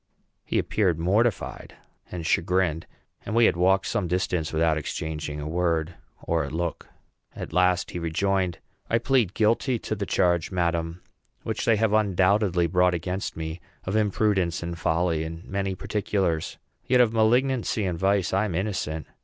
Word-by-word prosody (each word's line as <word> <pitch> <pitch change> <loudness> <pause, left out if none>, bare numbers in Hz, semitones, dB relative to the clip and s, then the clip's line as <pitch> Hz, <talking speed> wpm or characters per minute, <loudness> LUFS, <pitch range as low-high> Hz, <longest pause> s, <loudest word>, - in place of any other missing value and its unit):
He - - -2
appeared 95 -7 +1
mortified 100 +6 0 0.4
and 85 -2 -5
chagrined; 85 -1 +1 0.4
and 110 - -4
we 115 0 +6
had - - +3
walked 95 +2 +3
some 95 - -1
distance 90 -2 -1
without 80 0 +2
exchanging 75 -1 -4
a 75 - -5
word 85 0 0 0.3
or 85 -1 0
a 70 - -5
look. 85 +3 -3 0.5
At - - -7
last 90 +1 +2
he 90 - -4
rejoined, 90 +1 0 0.3
"I 115 - +3
plead 120 -5 +1
guilty 115 +3 +2
to 110 - -4
the 100 -2 -3
charge, 85 -2 +2
madam, 85 -1 -1 0.4
which - - -3
they 115 - +4
have 110 0 +1
undoubtedly 100 -3 +3
brought 90 +1 +3
against 90 +2 -4
me, 80 +1 -5 0.2
of 95 - -3
imprudence 100 -5 +1
and 85 0 -4
folly 80 0 0
in 80 +1 -7
many 95 -1 -2
particulars; 95 -5 -1 0.3
yet 125 0 +4
of 120 -2 +4
malignancy 120 -1 +2
and 90 -3 -2
vice 95 -1 +1
I 100 +3 +2
am 95 -6 -3
innocent. 85 -5 -2
90 Hz, 160 wpm, -25 LUFS, 85-105 Hz, 0.5 s, we